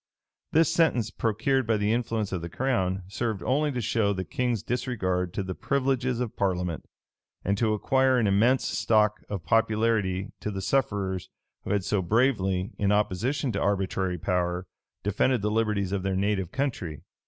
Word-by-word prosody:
[*] - - -62
This 165 +1 +4
sentence, 125 -10 +2
procured 120 +4 0
by 110 -1 +3
the 105 +1 +1
influence 115 -3 -1
of 90 -3 -2
the 85 - -5
crown, 95 -5 0
served 110 +1 -3
only 145 +3 +1
to 125 -2 -2
show 105 -2 +1
the 95 -1 -3
king's 125 -6 -1
disregard 95 -8 -1
to 100 - -1
the 95 0 -4
privileges 130 0 0
of 125 -3 -3
parliament, 90 -4 -1 0.6
and 100 - +2
to 110 -2 +2
acquire 130 +4 +3
an 120 - +2
immense 110 +6 +3
stock 110 -2 +2
of 95 -6 -4
popularity 110 -2 +1
to - - -3
the 100 -2 -4
sufferers 100 -5 -1 0.4
who - - -5
had 100 -1 +1
so 100 0 0
bravely, 95 -3 +1
in 100 -1 +2
opposition 105 +7 0
to - - -2
arbitrary 95 -2 0
power, 90 +1 -1 0.4
defended 105 +3 +1
the 105 - +1
liberties 105 -3 0
of 100 -1 -1
their 95 0 -1
native 95 -2 0
country. 115 - -3
105 Hz, 170 wpm, -27 LUFS, 95-120 Hz, 0.6 s, This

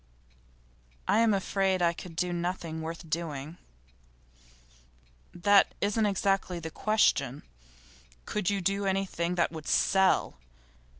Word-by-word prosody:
'I'm 225 +1 +4
afraid 195 -1 +1
I 170 -1 +2
could 170 0 -10
do 180 +1 -1
nothing 170 -2 -3
worth 165 +1 -6
doing.' 155 -1 -4 1.7
'That 200 +3 +3
isn't 210 +1 +1
exactly 195 -2 0
the 160 -1 -7
question. 150 - +1 0.8
Could 210 -3 -1
you 200 -1 -1
do 195 +2 0
anything 190 -3 -1
that 170 -2 +1
would 160 -2 -8
sell? 190 -1 +2
180 Hz, 110 wpm, -29 LUFS, 165-195 Hz, 1.7 s, I'm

